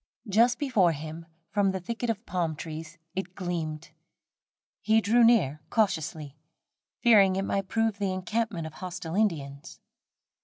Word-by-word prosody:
Just 230 Hz, +5 st, +4 dB
before 210 Hz, -, +2 dB
him, 160 Hz, +2 st, -8 dB, 0.2 s
from 205 Hz, -2 st, +2 dB
the 190 Hz, 0 st, -2 dB
thicket 230 Hz, +5 st, -4 dB
of 225 Hz, 0 st, -2 dB
palm 170 Hz, -3 st, -1 dB
trees 160 Hz, +2 st, -7 dB, 0.2 s
it 185 Hz, -1 st, -5 dB
gleamed. 165 Hz, -4 st, -4 dB, 0.9 s
He 220 Hz, +1 st, +4 dB
drew 225 Hz, +3 st, +4 dB
near 185 Hz, -, +4 dB
cautiously, 160 Hz, -9 st, -1 dB, 0.7 s
fearing 200 Hz, -6 st, +6 dB
it 195 Hz, -, 0 dB
might 195 Hz, -1 st, -1 dB
prove 225 Hz, 0 st, 0 dB
the 200 Hz, -2 st, 0 dB
encampment 185 Hz, -1 st, -2 dB
of 160 Hz, -, -7 dB
hostile 180 Hz, -1 st, -6 dB
Indians. 145 Hz, -10 st, -2 dB
185 Hz, 140 wpm, -28 LUFS, 160-220 Hz, 0.9 s, fearing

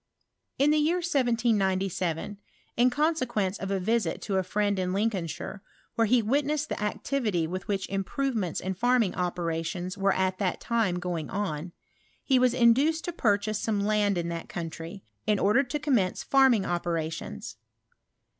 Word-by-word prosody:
In 285 Hz, +2 st, +4 dB
the 305 Hz, -, +3 dB
year 315 Hz, +4 st, +2 dB
1797, 205 Hz, -, 0 dB, 0.4 s
in 245 Hz, +2 st, +4 dB
eonseqoence 255 Hz, -, 0 dB
of 195 Hz, -, -4 dB
a 195 Hz, -1 st, 0 dB
vbK 210 Hz, -2 st, 0 dB
;to 195 Hz, -2 st, -1 dB
a -, -, +3 dB
friend 205 Hz, +1 st, 0 dB
in 185 Hz, 0 st, -1 dB
Lincolnshire, 195 Hz, -2 st, -2 dB, 0.3 s
where 230 Hz, -1 st, +2 dB
he 240 Hz, +1 st, +4 dB
witnessed 290 Hz, +5 st, 0 dB
the -, -, -3 dB
ao 210 Hz, -, 0 dB
tivily 210 Hz, -12 st, -1 dB
with 185 Hz, +3 st, -5 dB
which 195 Hz, -1 st, -1 dB
improvements 200 Hz, -, -2 dB
in 190 Hz, +1 st, -3 dB
farming 235 Hz, 0 st, +2 dB
operations 175 Hz, +1 st, -3 dB
were 195 Hz, 0 st, +3 dB
at 185 Hz, 0 st, 0 dB
that 190 Hz, -3 st, 0 dB
time 225 Hz, -7 st, 0 dB
going 175 Hz, -3 st, -3 dB
on, 180 Hz, -4 st, -3 dB, 0.5 s
he 265 Hz, -2 st, +3 dB
was 250 Hz, -1 st, +3 dB
induced 270 Hz, +7 st, +4 dB
to 350 Hz, -, -3 dB
pur 210 Hz, -11 st, +3 dB
chase 210 Hz, +1 st, -3 dB
some 215 Hz, -2 st, 0 dB
land 205 Hz, -1 st, +2 dB
in 170 Hz, 0 st, -2 dB
that 170 Hz, -1 st, -5 dB
country, 165 Hz, +3 st, -6 dB, 0.2 s
in 210 Hz, -1 st, +3 dB
order 210 Hz, +7 st, +4 dB
to 275 Hz, +2 st, -3 dB
com 295 Hz, -2 st, -1 dB
mence 190 Hz, -6 st, +1 dB
farming 265 Hz, -7 st, +4 dB
operations. 165 Hz, -, -3 dB
205 Hz, 165 wpm, -28 LUFS, 180-245 Hz, 0.5 s, In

